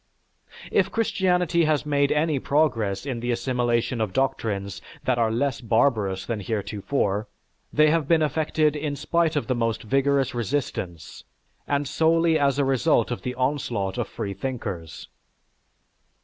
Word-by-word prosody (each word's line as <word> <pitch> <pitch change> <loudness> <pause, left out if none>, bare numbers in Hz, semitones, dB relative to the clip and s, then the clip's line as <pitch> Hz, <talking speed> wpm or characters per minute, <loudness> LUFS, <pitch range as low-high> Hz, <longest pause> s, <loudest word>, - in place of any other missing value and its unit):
"_) - - -12
If 190 -1 +2
Christianity 180 -6 +1
has 155 -1 +1
made 140 -1 +2
any 150 -1 +1
progress 120 -9 0
in 130 -4 -3
the 120 +1 -4
assimilation 120 -1 0
of 105 -4 -2
doctrines 110 -8 -1 0.2
that 125 -2 +1
are 115 -1 +3
less 130 +3 -1
barbarous 110 -5 +1
than 115 -3 -3
heretofore, 105 0 -2 0.4
they 155 0 +4
have 160 -3 +1
been 160 -1 +4
effected 155 0 +1
in 145 -1 -2
spite 165 +3 0
of 145 - 0
the 130 - 0
most 115 -2 -1
vigorous 135 +2 +1
resistance, 120 - -4 0.4
and 145 0 0
solely 165 +1 +3
as 140 -2 +2
a 140 - +2
result 135 -2 +2
of 120 - -3
the 125 0 -4
onslaught 125 -6 -1
of 115 - -1
freethinkers. 100 -6 -5
135 Hz, 145 wpm, -25 LUFS, 115-150 Hz, 0.4 s, they